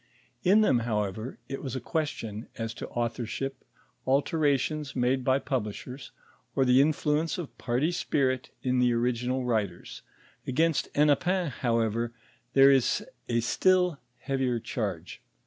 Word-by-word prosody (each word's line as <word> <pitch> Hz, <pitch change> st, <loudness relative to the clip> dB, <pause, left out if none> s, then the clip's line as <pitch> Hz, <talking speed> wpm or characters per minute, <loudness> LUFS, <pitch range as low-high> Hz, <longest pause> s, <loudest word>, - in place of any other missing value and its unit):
In 205 Hz, +4 st, +5 dB
thero, 130 Hz, -, +4 dB
however, 110 Hz, +1 st, -2 dB
it 135 Hz, 0 st, -5 dB
was 135 Hz, -3 st, -4 dB
a -, -, -1 dB
question 120 Hz, -7 st, -3 dB
as 115 Hz, -1 st, -3 dB
to -, -, -7 dB
authorship, 120 Hz, +3 st, -3 dB, 0.4 s
alterations 145 Hz, 0 st, +1 dB
made 130 Hz, +1 st, +1 dB
by 130 Hz, +1 st, +3 dB
pub 130 Hz, -6 st, -1 dB
lishers, 125 Hz, +5 st, -8 dB, 0.5 s
or 135 Hz, -, +3 dB
the 125 Hz, +1 st, +6 dB
Influence 150 Hz, +2 st, +1 dB
of 175 Hz, -5 st, -6 dB
party 130 Hz, +7 st, 0 dB
spirit 130 Hz, -6 st, 0 dB
in 130 Hz, -1 st, +1 dB
the 125 Hz, -1 st, +3 dB
original 125 Hz, +2 st, 0 dB
writers; 105 Hz, -7 st, -2 dB, 0.5 s
against 160 Hz, +4 st, +1 dB
Hennepin, 160 Hz, +5 st, +3 dB
however, 115 Hz, -1 st, 0 dB, 0.4 s
there 135 Hz, 0 st, +7 dB
is 130 Hz, -3 st, +2 dB, 0.2 s
a 115 Hz, -1 st, +2 dB
still 180 Hz, +5 st, +2 dB, 0.2 s
heavier 130 Hz, -3 st, -1 dB
charge. -, -, -4 dB
130 Hz, 130 wpm, -28 LUFS, 120-145 Hz, 0.5 s, there